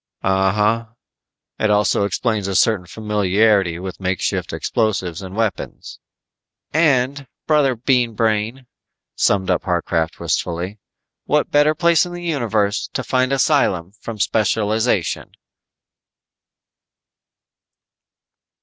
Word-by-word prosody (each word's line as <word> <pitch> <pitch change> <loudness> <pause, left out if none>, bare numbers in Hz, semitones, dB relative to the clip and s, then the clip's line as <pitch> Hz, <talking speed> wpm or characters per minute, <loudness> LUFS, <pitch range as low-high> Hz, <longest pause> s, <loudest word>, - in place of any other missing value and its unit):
"Uh 95 0 +2
huh. 105 +3 +1 0.7
It 110 - +1
also 105 -1 +2
explains 105 -1 -1
a 100 - -2
certain 95 -2 +2
familiarity 105 -2 +1
with 95 +1 -7
makeshift 95 -1 -2
explosives 95 -7 -1
and 95 0 -8
weapons." 110 -4 -3 0.7
"And, 140 -3 +2 0.2
brother 145 -4 +3
Bean 120 -1 +1
Brain," 110 +4 -1 0.5
summed 95 -2 +1
up 90 - 0
Harcraft 85 -2 -1
wistfully. 90 +4 -2 0.5
"What 150 0 +1
better 150 +1 +4
place 170 0 +4
in 175 -1 -6
the 175 0 -7
universe 110 - 0
to - - -2
find 130 0 +1
asylum 130 - +1
from 115 -2 -7
specialization." 110 - 0
110 Hz, 105 wpm, -20 LUFS, 95-130 Hz, 0.7 s, better